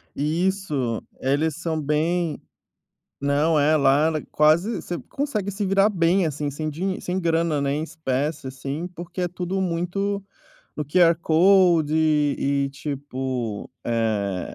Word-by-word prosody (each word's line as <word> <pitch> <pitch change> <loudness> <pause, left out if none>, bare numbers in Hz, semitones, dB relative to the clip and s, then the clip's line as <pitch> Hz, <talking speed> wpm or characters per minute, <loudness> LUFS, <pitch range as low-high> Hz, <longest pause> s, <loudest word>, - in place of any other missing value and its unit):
Isso. 155 - -1 0.2
Eles 145 +4 0
são 165 -1 -2
bem 155 +2 0 0.8
não, 145 +2 +2
é, 155 +2 +4
lá 140 +1 +4
ela 155 -2 -1
quase 160 +9 +3
você 175 - -5
consegue 230 -9 -2
se 200 +1 -3
virar 195 +2 +4
bem, 180 0 +2
assim, 150 -1 -2
sem 155 +2 -4
dinhe 185 +5 -3
sem 180 +1 -2
grana, 165 -3 +1
né, 140 0 0
em 150 - -2
espécie, 150 -2 -3
assim, 135 +6 -5
porque 175 +1 -7
é 180 - 0
tudo 180 +2 -3
muito 190 +3 -1 0.5
no 150 - -3
QR 170 +2 +5
Code, 170 -2 +4
e 145 -3 +1
tipo, 130 -6 -4
eh, 105 -5 -1
155 Hz, 135 wpm, -23 LUFS, 140-180 Hz, 0.8 s, QR